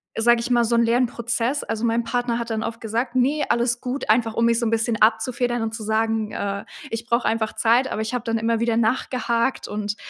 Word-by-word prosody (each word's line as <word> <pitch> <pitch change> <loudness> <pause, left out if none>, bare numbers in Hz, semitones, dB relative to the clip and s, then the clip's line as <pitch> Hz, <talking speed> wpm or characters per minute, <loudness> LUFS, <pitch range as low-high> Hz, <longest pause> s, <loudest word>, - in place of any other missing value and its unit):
sage 235 +1 +3
ich 245 +2 -4
mal, 240 -1 +4
so 235 +1 +1
'n 235 - +4
Lernprozess. 240 +2 0
Also, 225 +1 -4
mein 230 0 +1
Partner 240 0 -1
hat 235 -1 -4
dann 220 0 -1
oft 230 0 -4
gesagt, 235 +2 -3
„ne, 280 +4 +2
alles 235 0 +1
gut“, 250 -3 -1
einfach 225 -1 +1
um 230 - +2
mich 235 0 +3
so 235 - -1
'n - - +1
bisschen 230 0 0
abzufedern 240 +2 +2
und 225 0 -3
zu 220 - -6
sagen, 220 0 0
„äh, 200 0 -3 0.3
ich 225 +1 -4
brauche 235 0 +1
einfach 220 -1 0
Zeit“, 240 +3 +2
aber 215 - -2
ich 220 - -5
habe 245 -2 -2
dann 230 -1 -1
immer 225 0 0
wieder 230 -1 +1
nachgehakt 235 +1 0
und 210 0 -3
230 Hz, 230 wpm, -23 LUFS, 225-240 Hz, 0.3 s, mal